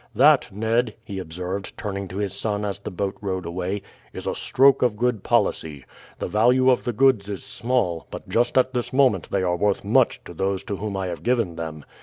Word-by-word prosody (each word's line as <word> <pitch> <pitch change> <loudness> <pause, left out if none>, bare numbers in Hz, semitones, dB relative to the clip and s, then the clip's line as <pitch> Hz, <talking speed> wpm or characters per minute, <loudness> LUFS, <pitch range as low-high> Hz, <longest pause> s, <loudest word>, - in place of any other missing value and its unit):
That, - - +5
Ned," 110 +3 0
he 100 -3 -6
observed, 90 +3 -5
turning 100 -2 -4
to 95 +2 -8
his 100 -2 -2
son 105 +1 -2
as 100 -1 -3
the 100 - -6
boat 100 0 -3
rowed 95 -3 -3
away, 90 +3 -3 0.3
"is - - -7
a - - -1
stroke 135 +1 +4
of 120 -4 +2
good 120 -2 0
policy. 75 -4 0 0.3
The - - -3
value 125 +4 +4
of 125 - 0
the 120 - 0
goods 120 -4 +3
is 100 -3 -5
small, 115 -9 -1
but - - -8
just 120 +2 +1
at 130 0 +3
this 125 -1 -2
moment 130 -9 +2
they 95 -2 0
are 90 -1 +1
worth 100 +3 0
much - - +2
to - - -10
those 95 +2 -1
to 100 - -4
whom 100 -1 -4
I 95 - -2
have 90 -2 -5
given 115 -8 0
them. 80 -3 -6
100 Hz, 215 wpm, -23 LUFS, 95-120 Hz, 0.3 s, That